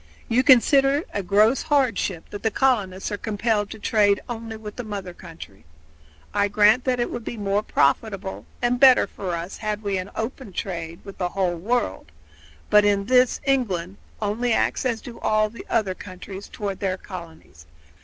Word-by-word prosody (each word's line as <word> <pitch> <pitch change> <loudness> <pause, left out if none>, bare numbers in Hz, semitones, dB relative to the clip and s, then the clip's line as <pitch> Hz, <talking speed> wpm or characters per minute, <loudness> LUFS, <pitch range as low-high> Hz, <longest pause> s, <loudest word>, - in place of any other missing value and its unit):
You 235 +2 +3
consider 270 +2 +5
it 300 - -3
a 200 - -1
gross 210 +7 +3
hardship 255 - 0
that 205 - -6
the 225 - +1
colonists 205 -6 0
are 205 - -3
compelled 215 -1 -1
to 220 - -8
trade 205 -2 +2
only 225 -2 -6
with 210 -1 -9
the 245 - -5
mother 200 -4 -6
country. 165 - -12 0.7
I 205 0 +2
grant 210 +4 +4
that 255 -2 +1
it 240 - -1
would 235 - -5
be 235 - -6
more 200 0 0
profitable 195 -3 0 0.2
and 245 0 +2
better 260 -1 +7
for 185 -3 -5
us 170 +3 -6
had 215 0 -3
we 200 -2 -1
an 185 +2 -6
open 225 -2 -5
trade 170 -3 -5
with 195 - -10
the 180 -1 0
whole 185 -2 0
world; 170 - -2 0.6
but 210 - +7
in 200 -1 +2
this 250 +1 +3
England 200 -9 0 0.2
only 225 +3 0
acts 260 - +1
as 230 -3 -2
do 235 -1 -10
all 215 0 +1 0.2
other 215 -5 +1
countries 190 +1 -9
toward 200 -2 -4
their 190 -2 -1
colonies. 160 - -11
205 Hz, 175 wpm, -23 LUFS, 190-235 Hz, 0.7 s, better